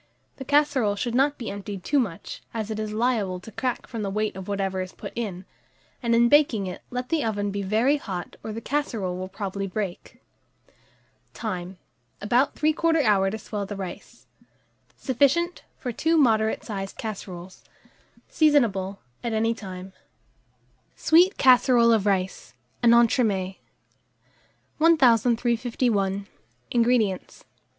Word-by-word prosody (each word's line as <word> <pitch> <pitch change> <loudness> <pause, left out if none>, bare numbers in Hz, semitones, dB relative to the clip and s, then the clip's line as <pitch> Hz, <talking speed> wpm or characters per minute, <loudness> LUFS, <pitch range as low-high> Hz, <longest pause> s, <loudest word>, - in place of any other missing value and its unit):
The 265 - -7
casserole 285 -7 +2
should 235 +3 -3
not 280 +3 +2
be 235 - -5
emptied 200 -1 -7
too 290 - +2
much, 195 -10 -4
as 220 -1 -3
it 215 - -3
is 215 -1 -3
liable 215 -5 0
to 200 +5 -12
crack 250 +3 -3
from 230 - -6
the 200 - -2
weight 215 +1 -1
of 190 -1 -8
whatever 195 -2 -1
is 185 0 -6
put - - -9
in; 195 -6 -4 0.6
and 235 -2 +2
in 235 +1 +5
baking 255 -7 +4
it, 180 - -6
let 250 0 -4
the 320 -2 +1
oven 205 -2 -1
be 200 0 -3
very 225 +9 +2
hot, 185 -10 -6
or 220 - -5
the 225 +2 -6
casserole 230 -11 -2
will 185 +1 -5
probably 195 0 -4
break. 190 -2 -5 1.2
Time. 185 -4 -5 0.4
About 245 +6 +1
3/4 315 +1 +2
hour 200 -4 +3
to 220 - -4
swell 205 -2 -5
the 205 - -5
rice. 190 -3 -8 0.7
Sufficient 285 +7 +1
for 250 - -4
2 325 +8 +1
moderate 220 -6 +2
sized 195 -3 -6
casseroles. 190 -4 -7 0.6
Seasonable 220 - +2 0.3
at 235 -2 -2
any 225 +1 +1
time. 190 -3 -9 1.0
SWEET 350 +4 +4
CASSEROLE 245 -2 +5
OF 210 -2 +1
RICE 190 -6 -1 0.3
(an 235 -1 +6
Entremets). 210 -5 +2 1.2
1351. 235 - +2 0.5
INGREDIENTS. 230 -5 +1
220 Hz, 140 wpm, -25 LUFS, 195-250 Hz, 1.2 s, an